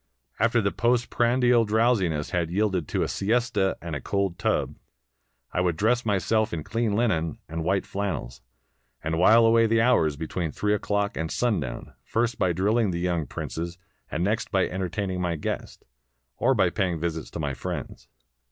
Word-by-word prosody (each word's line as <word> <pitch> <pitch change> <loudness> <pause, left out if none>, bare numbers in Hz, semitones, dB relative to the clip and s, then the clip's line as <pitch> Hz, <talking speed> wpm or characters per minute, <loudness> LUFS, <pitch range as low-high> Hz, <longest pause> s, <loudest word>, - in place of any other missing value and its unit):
After 115 +1 +3
the 100 -1 0
post 120 0 +1
prandial 120 0 +3
drowsiness 105 -8 +1
had 85 -2 0
yielded 95 -3 0
to - - 0
a - - -1
siesta 105 -2 0
and 85 -3 -4
a 70 - -4
cold 100 0 -1
tub, - - 0 0.8
I 90 - 0
would 90 -3 0
dress 115 +4 +1
myself 105 +2 +1
in 80 -3 -3
clean 115 0 -1
Unen 85 -10 0
and 80 +1 -4
white 95 +3 +1
flannels, 80 -12 -4 0.6
and 80 +1 -1
while 115 +5 +6
away 115 0 +5
the 115 +1 +2
hours 115 - +3
between 80 +1 -3
three 105 +5 0
o'clock 105 0 -1
and 80 0 -2
sundown, 95 - -2
first 115 +1 -1
by 90 - +2
driUing 105 +4 +1
the 85 - -2
young 85 -3 -1
princes, 85 +2 -5 0.3
and 85 - -2
next 105 +3 0
by 95 -1 +2
entertaining 95 0 -3
my 85 -2 0
guests, 75 - -5 0.5
or 130 +2 +2
by 95 -5 +3
pay 95 -4 0
ing 80 - -4
visits 80 -1 -3
to - - -7
my 75 -3 -2
friends. - - -6
95 Hz, 175 wpm, -26 LUFS, 85-115 Hz, 0.8 s, while